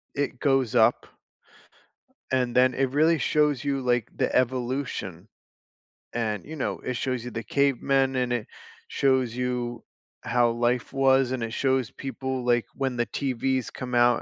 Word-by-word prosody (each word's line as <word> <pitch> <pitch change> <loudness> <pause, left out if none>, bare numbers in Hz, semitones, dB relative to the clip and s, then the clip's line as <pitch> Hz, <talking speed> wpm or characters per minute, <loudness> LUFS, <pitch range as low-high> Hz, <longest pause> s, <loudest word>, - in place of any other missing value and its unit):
It 140 -3 -2
goes 135 -5 +2
up 120 0 +4 1.3
and 125 -2 0
then 130 0 +5
it 135 +1 0
really 160 +4 +3
shows 150 0 +1
you, 140 -1 0
like, 125 -3 0
the - - -1
evolution, 125 -7 -1 0.9
and, 110 -3 -2
you 160 - -8
know, 145 - -3
it 125 - -4
shows 125 0 -2
you 125 - -6
the 115 0 -5
cavemen 135 +1 +1
and 125 -1 0
it 120 -3 -2 0.4
shows 130 -4 +1
you 125 -2 -3 0.4
how 120 -1 +2
life 120 +1 0
was 135 -1 +3
and 130 -3 -2
it 115 0 -4
shows 130 -4 0
people, 130 -2 -4
like, 120 -1 +2
when 135 -3 -2
the 120 - +1
TVs 130 -1 -1
come 125 -1 -5
out. 120 0 +4
125 Hz, 155 wpm, -26 LUFS, 120-135 Hz, 1.3 s, then